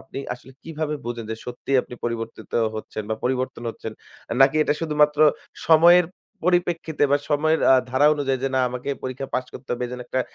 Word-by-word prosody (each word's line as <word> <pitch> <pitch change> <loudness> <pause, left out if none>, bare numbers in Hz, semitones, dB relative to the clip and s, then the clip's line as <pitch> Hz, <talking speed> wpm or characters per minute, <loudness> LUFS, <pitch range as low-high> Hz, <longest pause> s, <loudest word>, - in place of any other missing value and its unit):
আপনি - - -9 0.2
আসলে 125 +1 -16
কিভাবে 155 -1 -3
বুঝেন 120 -1 -4
যে, 110 - -3
সত্যিই 125 +2 0
আপনি - - -10
পরিবর্তিত 115 -1 -5 0.2
হচ্ছেন 110 0 -5
বা - - +1
পরিবর্তন 130 -1 -1
হচ্ছেন? 110 0 -8 0.5
নাকি 135 +3 +6
এটা 150 - +1
শুধুমাত্র 150 -2 +2 0.5
সময়ের 170 +2 +7 0.4
পরিপ্রেক্ষিতে 175 -4 +1
বা 145 - +5
সময়ের 155 +2 +2
আ - - +8 0.2
ধারা 130 +3 +4
অনুযায়ী 135 -3 -1
যে, - - +2
না 130 - +3
আমাকে 125 0 -7
এই - - -8
পরীক্ষা 130 +1 -4
পাস 130 0 0
করতে 130 - -11
হবে 125 - -3
এজন্য 125 0 -7
একটা 130 - -1
135 Hz, 185 wpm, -23 LUFS, 125-150 Hz, 0.5 s, আ